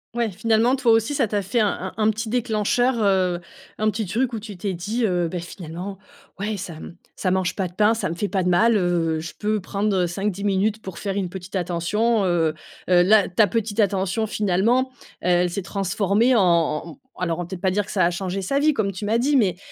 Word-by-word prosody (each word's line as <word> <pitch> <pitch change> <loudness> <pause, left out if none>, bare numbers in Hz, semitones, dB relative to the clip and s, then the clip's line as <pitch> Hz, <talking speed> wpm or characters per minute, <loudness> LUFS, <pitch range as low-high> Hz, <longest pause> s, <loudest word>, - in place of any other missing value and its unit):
Ouais, 235 -2 0
finalement 225 +5 +2
toi 255 -4 +2
aussi 225 +5 +2
ça 270 -5 +1
t'a 205 -1 -1
fait 200 +6 0
un 215 - +4
un 190 -1 -5
un 215 0 +3
petit 220 +1 -2
déclencheur 245 +1 +1
heu, 185 -3 +2 0.4
un 215 0 +1
petit 215 0 -3
truc 240 +6 -1
où 225 - -2
tu 205 -2 -9
t'es 190 +1 -3
dit, 215 +7 -2
heu: 175 -4 +1
«Beh 180 - -3
finalement 175 +2 -7 0.4
ouais 210 +1 -2
ça 180 -3 -6
m 160 +2 -10 0.2
ça 185 - -1
mange 185 -1 0
pas 190 -2 -1
de 175 - -15
pain, 210 +3 +3
ça 225 - -2
me 165 - -4
fait 205 +4 -2
pas 195 -2 0
de 180 - 0
mal, 225 +6 +4
heu, 170 -4 +1
je 155 0 -7
peux 215 0 0
prendre, 200 +2 -1
heu, 180 -1 +2
5-10 195 +3 -3
minutes 205 +2 +1
pour 190 -4 -8
faire 195 -2 -3
une 195 -3 -1
petite 185 +1 -8
attention, 195 +6 0
heu». 165 -3 +1 0.3
Heu, 175 -1 +6
la 205 +1 +4
ta 195 +4 +4
petite 220 +1 -2
attention 195 +1 +1
finalement, 215 +5 +1 0.3
heu, - - -1
elle 175 0 +3
s'est 200 - -3
transformée 200 +5 +1
en 215 - +5
en 165 -3 +2
en - - -8
mmh - - -16 0.3
alors 170 -2 -1
on - - -1
va 175 - -5
peut-être 190 -2 -6
pas 190 - +2
dire 200 +2 0
que - - -9
ça 185 -4 +2
a 175 - +2
changé 190 +2 -3
sa 275 +9 0
vie 305 +2 +4
comme 200 -5 -1
tu 190 - -7
m'as 215 +3 +1
dit. 275 +5 +2
Mais 190 -9 +2
200 Hz, 245 wpm, -23 LUFS, 180-220 Hz, 0.4 s, Heu